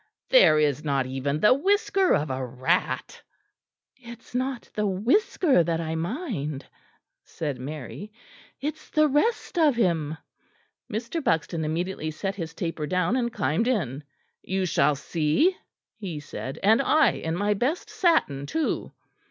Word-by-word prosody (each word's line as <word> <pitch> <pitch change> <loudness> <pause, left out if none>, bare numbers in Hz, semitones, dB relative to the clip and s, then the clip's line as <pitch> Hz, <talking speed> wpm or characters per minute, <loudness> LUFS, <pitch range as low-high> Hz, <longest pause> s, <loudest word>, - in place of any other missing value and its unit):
There - - +7
is 150 -1 +1
not 140 -3 0
even 135 +3 -2
the 210 - +7
whisker 390 +5 +2
of 150 -1 -1
a 130 0 -2
rat." 130 +8 -1 0.7
"It 235 -2 -11
is - - -21
not 255 -1 -2
the 210 -1 0
whisker 245 - +2
that 165 -1 -1
I 160 -1 -3
mind," 165 - -3 0.6
said 145 -5 -5
Mary, 150 - -7 0.5
"it 300 +3 -2
is - - -19
the 305 -1 +3
rest 345 - 0
of 300 -5 +4
him." 165 -8 0 0.7
Mr. 235 +9 -3
Buxton 165 - 0
immediately 160 +1 -2
set 195 +5 -3
his 165 -4 -6
taper 165 -4 -3
down 180 - +1
and 240 -2 0
climbed 155 - 0
in. 155 - -1 0.4
"You 190 0 -1
shall 150 -4 +2
see," 160 - +1 0.4
he 185 -9 -5
said, 145 -1 -7
"and 220 +5 +5
I 310 +3 +4
in 160 0 -3
my 205 +3 +1
best 255 - -1
satin 145 - +1
too!" 320 -1 -2
180 Hz, 145 wpm, -26 LUFS, -, 0.7 s, There